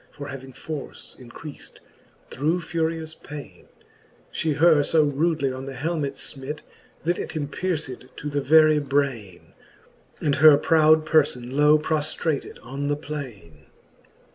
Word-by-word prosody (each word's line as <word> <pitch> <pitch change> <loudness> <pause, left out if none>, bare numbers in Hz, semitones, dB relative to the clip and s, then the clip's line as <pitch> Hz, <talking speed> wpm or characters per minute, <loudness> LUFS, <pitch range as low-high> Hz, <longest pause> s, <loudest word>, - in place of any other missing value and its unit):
For 145 0 -9
having 135 -1 -8
force 150 +2 -8
increaft 130 +4 -10 0.6
through 160 +6 0
furious 160 -1 -2
paine, 140 - -11 0.6
She 160 -1 -1
her 160 +2 +5
fb 145 0 +2
rudely 155 -3 +1
on 130 +1 -7
the 135 - -6
helmet 150 0 -2
fmit. 140 +2 -5 0.4
That 175 +2 0
it - - -5
empierced 150 -3 -3
to 150 - -6
the 145 -1 -1
very 155 +1 +5
braine, 125 - -2 0.7
And 145 -2 0
her 150 -1 +8
proud 155 0 +4
perlbn 130 -6 +1
low 150 +2 +5
proftrated 155 -1 -1
on 135 +4 -4
the 145 - +1
plaine. 115 - -8
145 Hz, 130 wpm, -24 LUFS, 135-155 Hz, 0.7 s, her